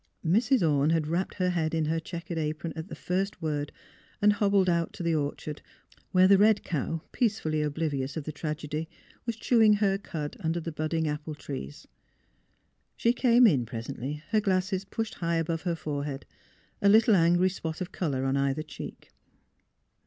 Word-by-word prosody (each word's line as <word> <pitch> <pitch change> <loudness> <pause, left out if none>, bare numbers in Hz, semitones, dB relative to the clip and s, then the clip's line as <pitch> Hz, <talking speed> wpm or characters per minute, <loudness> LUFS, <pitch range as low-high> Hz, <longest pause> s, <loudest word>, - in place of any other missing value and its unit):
Mrs. 220 +3 +3
Orne 145 0 +3
had 160 -2 +2
wrapped 170 +5 -2
her 180 -1 +1
head 165 -2 0
in 160 -1 +1
her 160 +2 0
checkered 170 0 -5
apron 155 +1 -3
at 160 +1 -6
the - - -7
first 195 +3 -2
word 150 -2 -2 0.5
and 210 0 +5
hobbled 200 -2 +2
out 170 -1 +1
to 180 - -6
the 170 -1 +1
orchard, 150 0 -3 0.5
where 185 0 +6
the 195 0 +6
red 210 0 +4
cow, 160 0 -2
peacefully 200 - 0
ob 150 -1 -2
livious 140 -3 -2
of 155 - -3
the 155 - -5
tragedy, 155 +1 -4 0.4
was 235 - -1
chewing 225 -1 +4
her 200 -2 +2
cud 155 -7 -5
under 165 +1 -1
the 165 0 -5
budding 155 +1 -1
apple 150 +1 -4
trees. 135 - -7 1.1
She 235 - +3
came 245 -1 +5
in 145 - +4
presently, 130 +5 -5
her 215 0 +3
glasses 190 0 0
pushed 225 +2 -4
high 170 -1 -1
above 165 0 -1
her 175 -2 -1
forehead, 145 -3 -4 0.6
a 200 - +5
little 220 +1 +6
angry 175 +1 +4
spot 160 -3 -5
of 185 -1 -4
colour 135 -7 -1
on 135 0 +1
either 140 +2 0
cheek. 155 - -9
165 Hz, 175 wpm, -28 LUFS, 150-195 Hz, 1.1 s, where